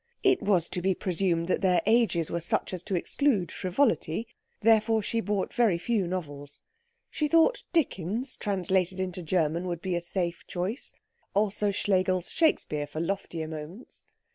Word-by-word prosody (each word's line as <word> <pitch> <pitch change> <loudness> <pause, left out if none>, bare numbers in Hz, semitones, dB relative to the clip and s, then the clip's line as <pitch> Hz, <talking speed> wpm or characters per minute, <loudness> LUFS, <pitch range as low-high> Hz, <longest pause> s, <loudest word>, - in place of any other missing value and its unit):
It 385 -2 +4
was 180 -5 +2
to 180 - -3
be 190 +1 +1
presumed 175 -2 0
that - - +1
their 180 -3 +3
ages 220 -7 +2
were 170 - -1
such 170 - -1
as 180 - -1
to 200 -3 -1
exclude 205 +1 +1
frivolity; 185 - 0 0.3
therefore 220 0 +4
she 230 +2 -1
bought 205 -1 -2
very 225 -8 +3
few 205 0 0
novels. 145 -6 -6 0.5
She 305 -1 0
thought 330 +11 +3
Dickens 250 - 0
translated 190 -2 0
into 185 -1 -3
German 170 +1 0
would 175 -2 -3
be 185 -1 -1
a 175 - -1
safe 175 0 -2
choice; 185 +8 -2 0.4
also 205 0 +1
Schlegel's 185 -2 +1
Shakespeare 150 - +1
for 155 - -6
loftier 170 -2 -3
moments. 160 +8 -8
185 Hz, 155 wpm, -28 LUFS, 170-215 Hz, 0.5 s, It